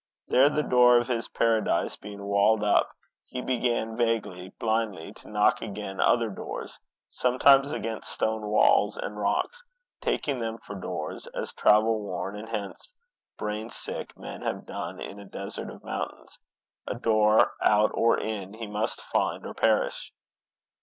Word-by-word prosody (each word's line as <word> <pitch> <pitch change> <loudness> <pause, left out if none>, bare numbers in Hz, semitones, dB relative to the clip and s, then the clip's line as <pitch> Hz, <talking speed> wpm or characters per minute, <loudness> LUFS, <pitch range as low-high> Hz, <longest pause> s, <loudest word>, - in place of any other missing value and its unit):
There, 135 +3 +6
the 150 0 0
door 125 -2 +6
of 120 0 +1
his 115 -2 -1
paradise 115 -1 +1
being 100 -1 -9
walled 100 +2 +3
up, 105 - +3 0.3
he 125 - -6
began, 120 -3 -1
vaguely, 110 -6 -1
blindly, 110 -6 -2
to - - -15
knock 105 0 +3
against 100 -2 -5
other 115 -2 +3
doors - - -7 0.3
sometimes 135 +2 +4
against 115 -6 -4
stone 110 -1 -1
walls 105 0 +4
and 105 - -5
rocks, 105 - -1 0.4
taking 140 -3 -1
them 115 -1 -3
for 100 - -10
doors 90 -5 -5
as - - -4
travel 110 +1 +4
worn, 100 0 -4
and 110 +2 -8
hence 105 -3 -5 0.5
brain 105 +2 -3
sick - - -6
men - - -8
have - - -3
done - - -6
in 100 - -7
a 100 - -10
desert 100 0 -6
of - - -12
mountains. - - -6 0.5
A - - -2
door, 110 -2 +4
out 105 +1 +4
or 115 0 +3
in, 105 -2 -4
he 115 0 -6
must 105 +1 -3
find, - - -1
or - - -6
perish. - - +1
110 Hz, 155 wpm, -27 LUFS, 105-115 Hz, 0.5 s, There